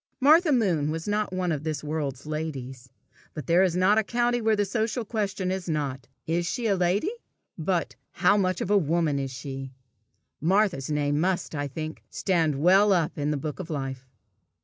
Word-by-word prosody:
Martha 310 +4 +5
Moon 180 - +2
was 160 +3 -4
not 210 0 0
one 185 -1 -1
of 150 -2 -2
this 155 -3 -3
world's 145 -3 -3
ladies; 135 -5 -5 0.5
but 150 -4 -5
there 170 +5 +4
is 185 -3 +2
a 205 +4 +4
country 240 +2 0
where 220 -1 +3
the 205 0 +1
social 220 +3 -1
question 200 -4 -2
is 190 -2 -3
not, 140 -4 -2 0.2
"Is 170 +2 0
she 245 +5 -2
a 205 -3 +3
lady?" 185 - +1 0.4
but, 170 +1 -1 0.2
"How 200 +3 +4
much 185 -3 +1
of 200 - -2
a 205 - +6
woman 160 -3 +1
is 135 -1 -3
she?" 135 +1 -7 0.7
Martha's 185 -5 +2
name 145 -1 0
must, 180 +1 0
I 145 -1 -2
think, 155 +3 -6
stand 165 -6 +1
well 190 +6 +5
up 170 -5 +1
in 145 -1 -1
the 150 - 0
book 150 +3 -5
of 180 -2 -6
life. 135 -3 -4
170 Hz, 185 wpm, -26 LUFS, 145-200 Hz, 0.7 s, a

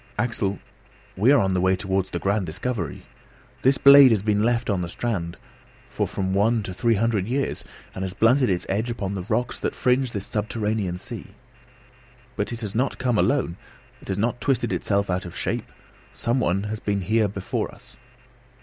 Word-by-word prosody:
"Axel, 100 -5 -1 0.6
we 110 +8 +4
are 145 - +6
on 95 -1 +1
the 90 - +1
way 95 +1 +3
towards 95 0 -1
the 90 - -3
grand 100 +1 0
discovery. 90 - -4 0.6
This 135 +1 +4
blade 140 -1 +9
has 110 -4 +2
been 105 -1 +2
left 120 +2 +1
on 100 -4 0
the 85 - -4
strand 85 -5 -3 0.5
for - - -2
from 95 -1 -2
one 110 +3 +2
to 95 - -5
three 115 +4 +2
hundred 105 -2 0
years, 135 +3 -1 0.3
and 95 - -4
has 95 0 -4
blunted 125 +5 +4
its 90 -2 0
edge 110 +5 -1
upon 100 -4 -3
the 95 - -3
rocks 125 0 -1
that - - -2
fringe 125 0 +1
this 100 -3 -3
subterranean 105 -3 -2
sea!" - - -8 1.0
"But - - -2
it 120 0 -5
has 105 -3 -5
not 125 +4 0
come 125 -4 +1
alone. 130 -12 +1 0.4
It - - -15
has 95 - -2
not 120 +3 -1
twisted 125 -4 +1
itself 100 -1 0
out 90 +1 -1
of 85 - -8
shape; - - -3 0.4
some 120 +3 -1
one 95 -3 +1
has 105 +1 -4
been 100 -2 -1
here 110 +3 +2
before 100 -1 -3
us! - - -16
105 Hz, 190 wpm, -24 LUFS, 95-120 Hz, 1.0 s, blade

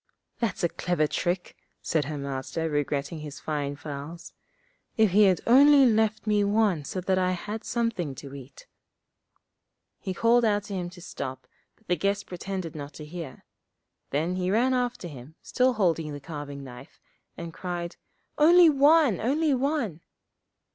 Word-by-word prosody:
'That's 230 -6 -2
a 170 - +3
clever 175 -3 0
trick!' 175 +4 -2 0.2
said 155 -3 0
her 150 +1 -4
Master, 140 +3 -3
regretting 145 +1 -2
his 150 -2 -8
fine 145 -1 -3
fowls. 150 +2 -8 0.6
'If 220 -3 +4
he 205 +3 +6
had 185 -2 +3
only 275 +3 +7
left 220 -2 +2
me 210 -1 +2
one 200 -6 +2
so 185 - -4
that 185 +1 +1
I 185 0 +1
had 210 +5 -5
something 225 - -2
to 135 +1 -10
eat.' 135 -1 -11 1.3
He 190 - -5
called 235 +4 +4
out 205 -2 +2
to 205 - -8
him 180 -2 -3
to 175 0 -14
stop, 130 -6 -6 0.3
but 220 - -32
the 180 - +1
guest 200 +4 -1
pretended 185 -2 -5
not 145 -1 -7
to 150 - -8
hear. 160 -3 -8 0.6
Then 165 +6 -1
he 180 0 -1
ran 240 +6 +2
after 245 -7 -1
him, 145 0 -11
still 255 0 +2
holding 165 -8 0
the 145 - -6
carving 145 -1 -7
knife, 125 0 -12 0.4
and 170 -1 -7
cried, 175 0 -5 0.4
'Only 335 +2 +7
one, 285 - +4
only 295 +5 +2
one!' 255 - -1
180 Hz, 160 wpm, -27 LUFS, 150-220 Hz, 1.3 s, only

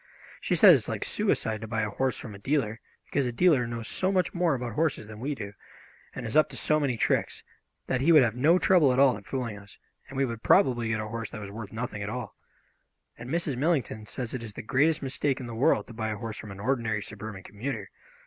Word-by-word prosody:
She - - 0
says - - +9
it - - +5
is - - -6
like - - -3
suicide 110 -1 0
to 110 - -6
buy 110 0 -1
a 105 - -2
horse 130 +4 -1
from 110 - -8
a 100 - -10
dealer, 115 -2 -1 0.3
because 140 -3 0
a - - -1
dealer 135 -3 +3
knows 115 -1 -5
so 190 +1 0
much 185 -2 +1
more 175 -5 +2
about 120 -3 -4
horses 155 -4 0
than 105 0 -10
we 140 +4 -2
do, 100 -5 -7 0.6
and 125 - -5
is 110 - -4
up 155 - +5
to - - -8
so 155 0 +2
many 135 -5 0
tricks, - - 0 0.4
that 130 -1 -1
he 160 +5 +4
would 155 -5 +8
have 115 -3 +1
no 155 +8 +4
trouble 175 -7 +4
at 125 - 0
all 135 -2 +5
in 105 - -9
fooling 120 -2 -4
us, 100 0 -16 0.3
and 135 - -8
we 135 - +3
would 115 -3 -5
probably 120 - +3
get 110 0 0
a 110 - -3
horse 115 +1 -5
that 110 - -7
was 100 -2 -7
worth 105 -1 -7
nothing 110 -2 -4
at 100 - -3
all. 120 -1 -5 0.8
And 120 +1 -9
Mrs. 160 -4 -1
Millington 130 -8 0
says 120 0 -5
it 125 -2 -4
is 110 -2 -7
the - - -7
greatest 145 +7 +2
mistake 135 0 -1
in 130 - -6
the 120 - -7
world 110 -3 +2
to - - -12
buy 110 -1 -3
a 105 - -3
horse 110 +1 -6
from 105 - -8
an 100 0 -9
ordinary 110 -3 0
suburban 105 -3 -8
commuter. 110 -1 -5
120 Hz, 255 wpm, -28 LUFS, 110-140 Hz, 0.8 s, says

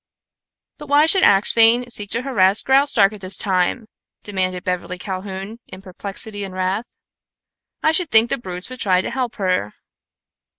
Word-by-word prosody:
"But 295 - -10
why 290 +2 +4
should 370 +4 +3
Axphain 230 - +4
seek 205 -3 -1
to 235 +3 0
harass 205 -7 +2
Graustark 265 -7 +3
at 210 - -11
this 185 0 0
time?" 190 +4 -1 0.4
demanded 185 -2 -3
Beverly 180 -1 -4
Calhoun, 195 +3 -7
in 185 - -11
perplexity 200 +2 -4
and 190 -1 -8
wrath. 185 +5 -2 1.0
"I 315 - +4
should 320 0 -1
think 225 +1 +4
the 275 - -1
brutes 180 -5 -5
would 255 - -8
try 185 -4 +2
to - - -5
help 255 -3 -3
her." 185 - -2
205 Hz, 160 wpm, -20 LUFS, 185-240 Hz, 1.0 s, why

